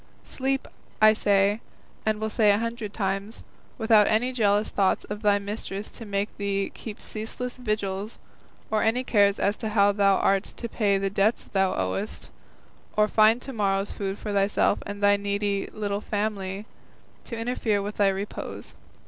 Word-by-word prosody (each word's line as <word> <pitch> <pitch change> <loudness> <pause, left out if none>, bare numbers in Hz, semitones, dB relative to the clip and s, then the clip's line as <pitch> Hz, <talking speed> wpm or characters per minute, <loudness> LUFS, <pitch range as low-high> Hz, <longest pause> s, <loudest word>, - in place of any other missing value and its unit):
Sleep, 270 0 -2 0.3
I 215 0 +7
say, 205 0 +2 0.5
and 215 -1 +1
will 220 0 -2
say 215 -2 +4
a 200 - +5
hundred 230 -1 -3
times, 195 +1 -3 0.3
without 220 -2 +5
any 235 +4 +2
jealous 210 -3 +2
thoughts 195 -2 +1
of 210 +1 -6
thy 205 -2 +4
mistress 200 0 -5
to 230 - -10
make 200 +1 -2
thee 200 -1 -1
keep 215 -3 -8
ceaseless 235 +3 -6
vigils, 215 -3 -3 0.5
or 215 -1 +2
any 230 +3 +2
cares 205 -5 +3
as 200 +1 +1
to 220 - -3
how 205 -1 +4
thou 200 -1 +3
art 195 0 +2
to 235 - -6
pay 205 -3 +1
the 195 0 -1
debts 205 +3 +2
thou 190 -1 +1
owest, 95 0 -3 0.7
or 210 0 +5
find 220 +3 +4
to 270 - -6
morrow's 195 -2 0
food 195 -1 -4
for 210 -1 -5
thyself 200 0 +2
and 205 0 -6
thy 205 0 +5
needy 200 0 -1
little 205 -1 -3
family, 205 -2 -3 0.6
to 230 - -6
interfere 230 -3 0
with 205 +1 -5
thy 205 - +4
repose. 195 +1 -4
205 Hz, 165 wpm, -26 LUFS, 200-220 Hz, 0.7 s, I